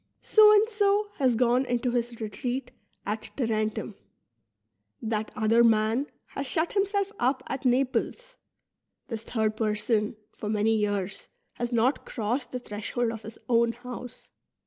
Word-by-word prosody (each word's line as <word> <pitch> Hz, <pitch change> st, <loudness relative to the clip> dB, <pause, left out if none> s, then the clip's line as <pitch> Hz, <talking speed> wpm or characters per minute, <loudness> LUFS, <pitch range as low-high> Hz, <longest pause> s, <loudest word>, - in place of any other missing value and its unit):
So 430 Hz, -1 st, +7 dB
and 425 Hz, +1 st, +5 dB
so 415 Hz, -1 st, +2 dB
"' -, -, -31 dB
has 255 Hz, -4 st, +3 dB
gone 245 Hz, +2 st, +3 dB
into 245 Hz, -1 st, 0 dB
his 240 Hz, -1 st, -2 dB
retreat 245 Hz, +4 st, -3 dB, 0.3 s
at 215 Hz, +2 st, -3 dB
Tarentum; 220 Hz, -4 st, -1 dB, 1.1 s
that 220 Hz, -1 st, -2 dB
other 225 Hz, +2 st, +4 dB
man 225 Hz, +4 st, +3 dB, 0.2 s
has 275 Hz, -, -5 dB
shut 320 Hz, +5 st, -1 dB
himself 400 Hz, 0 st, +1 dB
up 255 Hz, +2 st, +1 dB
at 270 Hz, 0 st, -4 dB
Naples; 275 Hz, -, 0 dB, 0.7 s
this 225 Hz, -3 st, -4 dB
third 220 Hz, -2 st, -1 dB
person 215 Hz, 0 st, 0 dB, 0.2 s
for 210 Hz, -, -5 dB
many 215 Hz, +1 st, +2 dB
3'ears 205 Hz, -2 st, -2 dB, 0.3 s
has 240 Hz, 0 st, -3 dB
not 240 Hz, +4 st, +2 dB
crossed 245 Hz, +3 st, -2 dB
the 255 Hz, -, -2 dB
threshold 230 Hz, +1 st, -2 dB
of 225 Hz, -1 st, -7 dB
his 220 Hz, +1 st, -10 dB
own 235 Hz, -1 st, +3 dB
house. 250 Hz, 0 st, -9 dB
240 Hz, 145 wpm, -27 LUFS, 220-265 Hz, 1.1 s, So